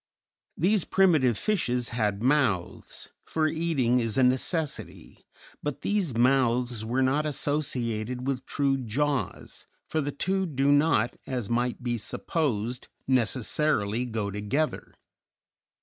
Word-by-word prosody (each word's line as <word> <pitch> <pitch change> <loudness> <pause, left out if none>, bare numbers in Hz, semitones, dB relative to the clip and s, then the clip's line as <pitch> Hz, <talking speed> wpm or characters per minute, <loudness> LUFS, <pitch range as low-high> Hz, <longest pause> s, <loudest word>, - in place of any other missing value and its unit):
These 195 +2 +2
primitive 155 - +3
fishes 125 - 0
had 105 -3 -1
mouths, 130 - 0
for 160 -1 -1
eating 155 -7 +1
is 115 -1 -1
a 130 - +5
necessity; 135 +5 -2 0.3
but 150 -2 -4
these 190 - 0
mouths 125 -2 +2
were 125 +4 0
not 145 +4 +2
associated 125 -5 -2
with 135 -1 -2
true 135 -1 +1
jaws, 135 +4 -2 0.2
for 160 - 0
the 145 0 -2
two 190 +6 -1
do 140 -2 +2
not, 145 -5 +3
as 125 -5 -3
might 120 +1 0
be 120 -1 -1
supposed, 125 -1 -2 0.2
necessarily 125 -2 +1
go 110 -4 -3
together. 105 +10 -2
130 Hz, 120 wpm, -27 LUFS, 120-150 Hz, 0.3 s, a